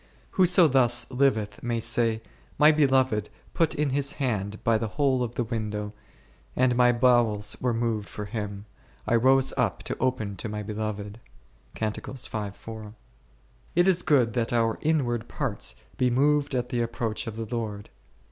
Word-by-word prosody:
Whoso 180 -2 +5
thus 125 -3 +2
liveth 125 -6 +1
may 120 -1 -1
say, 115 -1 +1 0.3
My 150 +2 +7
Beloved 130 -8 +2 0.2
put 165 -1 +1
in 150 -2 0
His 140 +1 0
hand 105 -6 -3
by 115 -1 +3
the 115 - -2
hole 135 -3 +2
of 120 -1 -3
the 120 - 0
window, 105 -2 -4 0.6
and 125 -1 +3
my 125 0 +5
bowels 120 -4 +2
were 125 - +1
moved 115 -3 -2
for 105 - -6
Him: 100 -1 -5 0.2
/ - - -29
rose 130 +3 +3
up 115 -8 0
to - - -3
open 110 -6 -1
to 110 - -4
my 105 0 -4
Beloved 105 0 -5 0.6
1. 110 -1 -5 0.8
It 175 +2 +4
is 180 -2 +4
good 125 -9 +3
that 120 -2 -1
our 115 -2 +1
inward 120 -7 0
parts 130 -8 -3 0.2
be 125 - +2
moved 145 +2 +2
at 125 -1 -1
the 120 -2 -1
ap 115 0 -3
proach 115 -2 -3
of 110 - -5
the 115 0 -4
Lord. 105 -3 -5
120 Hz, 160 wpm, -26 LUFS, 110-130 Hz, 0.8 s, My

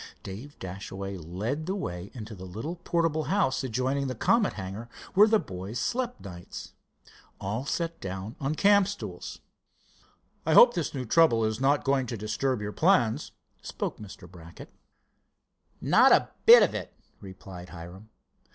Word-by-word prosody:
Dave 115 +10 -9
Dashaway 95 +1 -6
led 100 - -4
the 190 - -1
way 90 - -5
into 110 -2 -7
the 95 -2 -9
little 115 - -6
portable 165 -3 0
house 195 -11 +1
adjoining 130 +3 -1
the 130 - -3
Comet 220 - +2
hangar 100 +4 -7 0.2
where 205 +3 +7
the 220 0 +4
boys 95 - -6
slept 250 0 -2
nights. 90 -3 -9 0.7
All 110 +8 -3
sat 170 +1 -2
down 95 +3 -6
on 140 +3 -1
camp 200 +1 +5
stools. 105 - -7 1.0
"I 160 0 +2
hope 240 0 +9
this 165 -4 -3
new 130 -2 -3
trouble 115 -4 +4
is 110 +3 -2
not 140 +2 +3
going 135 -2 +1
to 115 - -4
disturb 110 +4 -1
your 105 - -3
plans," 145 - +2 0.3
spoke - - -5
Mr. 95 -4 -11
Brackett. 85 -2 -13 1.1
"Not - - +5
a - - +4 0.2
bit - - +10
of - - +1
it," - - -6 0.2
replied 95 -2 -10
Hiram. 90 +5 -11
115 Hz, 150 wpm, -28 LUFS, 95-155 Hz, 1.1 s, bit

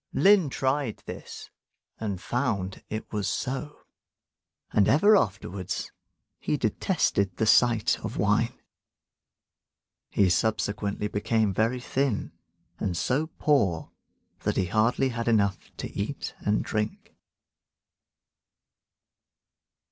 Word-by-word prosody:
Lin 195 -6 +5
tried 130 -3 -1
this, - - -9 0.5
and 100 -4 -3
found 100 -5 -2
it 110 +1 -5
was 105 -2 -1
so; 135 +3 -4 0.9
and 100 - +4
ever 205 +10 +6
afterwards 95 - -2 0.5
he - - -1
detested 100 -3 0
the 110 - +1
sight 115 0 +4
of - - -5
wine. - - +1 1.5
He 100 - +3
subsequently 105 0 0
became 105 0 +1
very 115 +5 +1
thin, 130 -2 -1 0.5
and 90 -3 -1
so 145 - 0
poor 100 - +1 0.5
that - - -1
he 95 - +2
had 90 - -8
hardly 120 +4 +2
enough 110 -5 +1 0.2
to - - -5
eat 105 +8 -4
and 105 +1 +1
drink. 105 0 -3
110 Hz, 100 wpm, -27 LUFS, 100-130 Hz, 1.5 s, ever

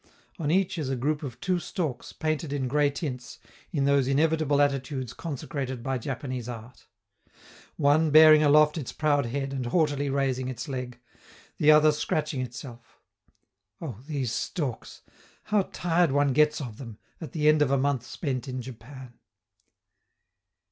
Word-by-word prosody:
on 150 -3 -1
each 185 +1 +1
is 145 -4 -3
a 135 - 0
group 145 +4 -1
of 130 -6 -7
two 180 -1 0
storks 155 -7 -4
painted 155 -1 -2
in 140 -2 -1
gray 145 +2 +2
tints 140 -4 -6 0.3
in 145 -6 0
those 140 -2 +3
inevitable 150 +1 +2
attitudes 135 -3 -1
consecrated 135 -5 -5
by 135 +1 -1
Japanese 125 -1 -5
art: 120 +1 -10 0.9
one 155 +2 +3
bearing 155 0 +8
aloft 150 +1 +4
its 135 - -6
proud 145 -4 +1
head 135 +2 -3
and 130 -3 -3
haughtily 145 -1 +1
raising 135 -2 -1
its 130 +4 -6
leg, 125 -3 -5 0.6
the 150 - +3
other 155 0 +7
scratching 150 -2 -2
itself. 120 -1 -9 0.8
Oh, 130 - -7
these 135 -7 -2
storks! 135 - -4 0.4
how 210 -3 0
tired 170 -1 +1
one 145 -1 +2
gets 150 +2 +3
of 120 -7 -7
them, 115 -6 -9 0.2
at 155 -6 -7
the 150 -2 +1
end 155 0 +5
of 145 - +3
a 140 - +2
month 135 -2 0
spent 135 -1 -4
in 130 0 -4
Japan! 125 +1 -11
140 Hz, 155 wpm, -27 LUFS, 130-155 Hz, 0.9 s, bearing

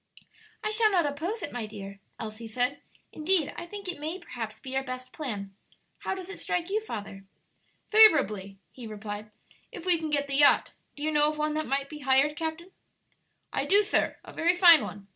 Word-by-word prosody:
"I 430 - 0
shall 430 0 +4
not 350 -5 +3
oppose 330 +10 -3
it, - - -4
my 240 -3 -4
dear," 200 -2 -9 0.2
Elsie 220 +1 -7
said; 250 +5 0 0.3
"indeed, 320 -1 +1
I 345 - -7
think 405 +1 -8
it 355 -5 -5
may 315 +4 -3
perhaps 230 - -7
be 260 0 -7
our 270 - +2
best 255 -1 -7
plan. 205 -10 -5 0.5
How - - -3
does 375 -2 -7
it 390 - -7
strike 355 +1 -2
you, 430 +2 +1
father?" 205 - -7 0.7
"Favorably," 215 - +5
he 245 -3 -9
replied, 210 0 -7 0.4
"if 345 - -9
we 355 -3 +3
can 315 -1 -3
get 285 -1 +1
the 275 -1 -1
yacht. 290 0 +5 0.2
Do 290 - -7
you 310 - +1
know 295 0 +4
of 305 - -5
one 305 0 0
that 310 0 -2
might 275 +2 0
be 300 +1 -9
hired, 280 +1 +3
captain?" 325 +3 -5 0.8
"I - - 0
do, 405 +2 +5
sir; 420 - +1
a - - -12
very 345 +2 +2
fine 345 -4 +8
one. 200 -1 -7
295 Hz, 200 wpm, -28 LUFS, 230-345 Hz, 0.8 s, fine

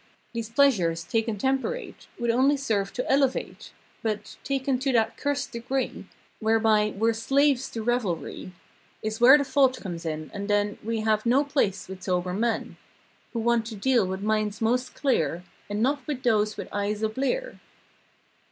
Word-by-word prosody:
These 230 -2 -4
pleasures, 200 - +3
taken 225 +1 -1
temperate 270 - -2
Would 235 -1 +1
only 270 +4 +3
serve 210 -7 -1
to 250 - -3
elevate; 270 -1 0 0.3
But, 215 -2 -3
taken 270 -1 0
to 270 +1 0
that 225 -1 +2
curst 285 0 -2
degree. 255 +3 -3 0.3
Whereby, 220 -1 +2
we're 225 +2 +2
slaves 270 +3 +2
to 225 - -5
revelry 215 -7 -2 0.5
Is 215 +1 -3
where 260 +4 +9
the 285 - 0
fault 265 -2 +3
comes 175 -4 -6
in, 155 -1 -4
and 200 0 -5
then 205 0 +1
We 225 0 -2
have 215 -1 +1
no 255 +4 +3
place 270 -9 0
with 190 0 -8
sober 180 -1 -1
men 225 +3 -1 0.6
Who 230 - -1
want 230 0 +2
to 225 - -6
deal 235 -1 +2
with 190 +1 -4
minds 215 0 0
most 245 +3 0
clear 175 - 0 0.3
And 205 +2 -1
not 280 +1 0
with 275 -4 -3
those 215 -3 +2
with - - -6
eyes 205 +1 -1
a 220 - +2
blear. - - -2
225 Hz, 165 wpm, -26 LUFS, 210-265 Hz, 0.6 s, where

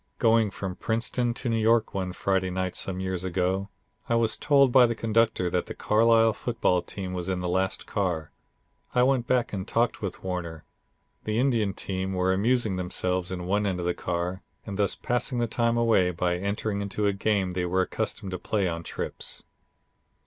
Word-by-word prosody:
Going 115 -1 +4
from 95 -1 -5
Princeton 120 +2 0
to 125 - -5
New 115 -1 +1
York 110 0 +3
one 95 -2 -2
Friday 95 0 0
night 95 0 -2
some 95 -1 -3
years 95 -1 -3
ago, 95 +2 -1 0.4
I 115 - +3
was 115 -1 +2
told 140 -3 +4
by 125 -1 +7
the 115 - -2
conductor 110 -4 +1
that 90 0 0
the - - -6
Carlisle 115 +1 +4
football 110 -7 0
team 95 0 -6
was 90 0 -3
in 95 -1 -1
the 90 - -2
last 95 +2 -1
car. 85 -6 -2 0.6
I 125 - +5
went 130 -2 +2
back 125 -3 +1
and 95 -2 -4
talked 115 0 0
with 100 -3 -5
Warner. 85 -4 -4 0.6
The 110 0 -1
Indian 115 -6 +1
team 95 0 -3
were 95 0 +2
amusing 110 0 +1
themselves 90 0 -1
in 90 -1 -4
one 100 +3 +1
end 90 -2 -1
of 85 - -3
the 90 - +1
car, 90 +2 -3 0.2
and 100 - -5
thus 100 - +2
passing 125 +1 -1
the 120 - +2
time 115 +1 +1
away 115 -6 +3
by 90 0 0
entering 100 +2 -2
into 100 +1 -2
a 100 - +2
game 100 -2 0
they 90 0 -1
were 95 +2 +2
accustomed 105 0 -3
to 90 - -4
play 100 -4 0
on 85 -1 -3
trips. - - -5
100 Hz, 190 wpm, -27 LUFS, 90-115 Hz, 0.6 s, by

